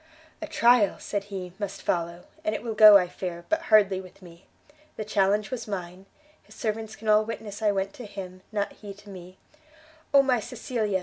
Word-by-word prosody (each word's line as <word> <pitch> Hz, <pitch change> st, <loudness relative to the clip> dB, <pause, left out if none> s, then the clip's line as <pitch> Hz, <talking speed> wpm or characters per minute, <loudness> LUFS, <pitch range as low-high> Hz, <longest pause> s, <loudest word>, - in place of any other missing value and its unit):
"A 315 Hz, -, -4 dB
trial," 235 Hz, -6 st, +4 dB
said 200 Hz, -1 st, -4 dB
he, 190 Hz, -3 st, -7 dB
"must 200 Hz, -2 st, -5 dB
follow, 170 Hz, 0 st, -2 dB, 0.2 s
and 215 Hz, -, -1 dB
it -, -, -5 dB
will 230 Hz, -2 st, -3 dB
go, 215 Hz, -1 st, +9 dB
I 180 Hz, -2 st, 0 dB
fear, 175 Hz, -1 st, -6 dB
but 320 Hz, +1 st, +1 dB
hardly 200 Hz, -3 st, +5 dB
with 185 Hz, +1 st, -16 dB
me! 170 Hz, 0 st, -15 dB, 0.5 s
the 215 Hz, -, -5 dB
challenge 205 Hz, +1 st, +1 dB
was 255 Hz, -3 st, -5 dB
mine; 185 Hz, -1 st, -6 dB, 0.3 s
his -, -, -18 dB
servants 220 Hz, -1 st, -3 dB
can 220 Hz, -, -10 dB
all 215 Hz, 0 st, +5 dB
witness 215 Hz, -2 st, -7 dB
I 210 Hz, -1 st, +3 dB
went 195 Hz, 0 st, -2 dB
to 245 Hz, -, -9 dB
him, 185 Hz, -2 st, -8 dB
not 205 Hz, -2 st, -1 dB
he 200 Hz, -2 st, -10 dB
to 205 Hz, +1 st, -16 dB
me, 185 Hz, 0 st, -11 dB, 0.7 s
Oh 280 Hz, -1 st, +6 dB
my 255 Hz, -3 st, +2 dB
Cecilia! 220 Hz, -4 st, -2 dB
205 Hz, 195 wpm, -26 LUFS, 190-220 Hz, 0.7 s, go